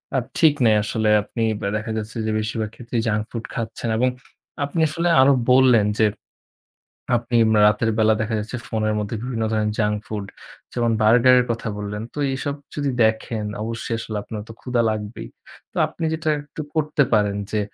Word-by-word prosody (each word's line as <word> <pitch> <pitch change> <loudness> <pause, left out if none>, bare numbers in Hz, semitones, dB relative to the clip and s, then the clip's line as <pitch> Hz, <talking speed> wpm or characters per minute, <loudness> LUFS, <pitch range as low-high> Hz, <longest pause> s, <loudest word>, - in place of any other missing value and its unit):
আর 130 - +1
ঠিক 160 -3 +5
নেই 110 - +5
আসলে 110 0 0
আপনি 115 +2 -4 0.2
ব্যা 100 - -1
দেখা 110 +1 -4
যাচ্ছে 110 +1 -5
যে 110 - 0
বেশিরভাগ 110 0 -2
ক্ষেত্রেই 120 -1 -3
junk 105 -1 +1
food 115 -1 -5
খাচ্ছেন 115 0 -4
এবং 125 +2 +3 0.5
আপনি 145 +4 -2
আসলে 170 +3 -1
আরও 140 +1 +6 0.2
বললেন 125 -5 +5
যে 110 - +5 1.1
আপনি 120 0 -1 0.3
রাতের 105 +2 +2
বেলা 110 0 +4
দেখা 110 +1 -1
যাচ্ছে 115 +4 -5
ফোনের 110 -1 0
মধ্যে 105 +2 -3
বিভিন্ন 120 -3 -2
ধরনের 105 -1 0
junk 105 -1 +1
food 105 -2 -4 0.5
যেমন 120 -1 +1
burger 120 +4 +6
এর - - +1
কথা 115 0 -2
বললেন। 105 +1 -4
তো - - -6 0.2
এসব 140 +2 -3 0.2
যদি 145 -2 -1
দেখেন 110 0 0 0.2
অবশ্যই 115 +1 -3
আসলে 110 -1 -5
আপনার 105 0 -6
তো 115 - -8
ক্ষুধা 125 -2 0
লাগবেই। 105 0 -5 0.4
তো - - -19
আপনি 165 - -6
যেটা 160 0 -2
একটু 145 +2 -10
করতে 150 -2 +2
পারেন 105 -2 +2
যে 105 - 0
115 Hz, 180 wpm, -22 LUFS, 110-125 Hz, 1.1 s, আরও